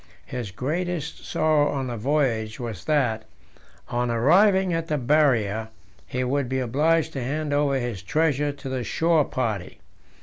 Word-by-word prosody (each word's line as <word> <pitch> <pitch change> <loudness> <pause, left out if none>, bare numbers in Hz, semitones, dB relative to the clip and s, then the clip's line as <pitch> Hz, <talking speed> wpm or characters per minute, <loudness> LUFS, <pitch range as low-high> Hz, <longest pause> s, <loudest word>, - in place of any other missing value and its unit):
His 120 -5 -5
greatest 155 - -3
sorrow 155 -2 +2
on 135 -2 -2
the 120 -2 -4
voyage 115 -3 0
was 115 -5 -6
that, 120 -8 +1 0.6
on 120 0 -1
arriving 185 - +4
at 165 0 -2
the 150 - 0
Barrier, 120 -6 +2 0.4
he 130 0 -2
would 130 0 -1
be 130 - -1
obliged 155 +6 +1
to 135 - -3
hand 145 +3 -2
over 145 -1 +2
his 120 -7 -3
treasure 145 +6 +1
to 140 -1 -9
the 130 -2 -2
shore 160 +2 +2
party. 110 -7 -3
135 Hz, 155 wpm, -24 LUFS, 120-155 Hz, 0.6 s, arriving